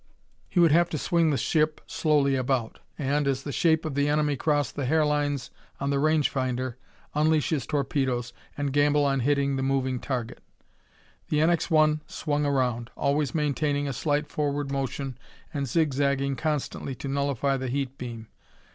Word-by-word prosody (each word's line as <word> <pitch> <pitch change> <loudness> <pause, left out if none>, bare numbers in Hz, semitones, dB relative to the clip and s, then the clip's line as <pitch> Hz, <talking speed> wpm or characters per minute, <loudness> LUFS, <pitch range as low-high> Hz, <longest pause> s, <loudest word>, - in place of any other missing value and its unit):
He 180 - 0
would 170 -3 +6
have 170 +2 +4
to 155 - -2
swing 165 +2 +2
the 145 - +1
ship 155 +4 +1
slowly 145 -3 +2
about; 130 -3 -1 0.2
and, 145 0 0
as 135 -1 0
the 145 - -4
shape 160 +1 +2
of 155 - -3
the 145 +1 +1
enemy 150 -1 +2
crossed 145 0 0
the 140 -3 -2
hair 155 +2 +3
lines 145 -2 -1 0.3
on 140 +1 -1
the 140 - +1
range 155 0 +3
finder, 130 -2 -2 0.4
unleash 155 0 +2
his 150 -5 -1
torpedoes 130 -4 -1 0.2
and 145 -2 -2
gamble 145 0 +3
on 135 -1 +1
hitting 140 +1 +1
the - - -1
moving 130 -1 0
target. 125 -4 -4 0.9
The 150 - +1
NX 165 +2 +2
1 155 -1 +4
swung 145 -1 -1
around, 125 -4 0
always 145 +2 0
maintaining 145 -1 0
a 135 - -2
slight 145 +4 0
forward 145 -1 -2
motion 135 -1 -3 0.3
and 140 -2 -2
zigzagging 140 -2 +1
constantly 150 -2 -2
to 140 - -7
nullify 140 -1 0
the 130 0 -4
heat 135 0 -2
beam. 115 -3 -7
140 Hz, 170 wpm, -26 LUFS, 135-150 Hz, 0.9 s, would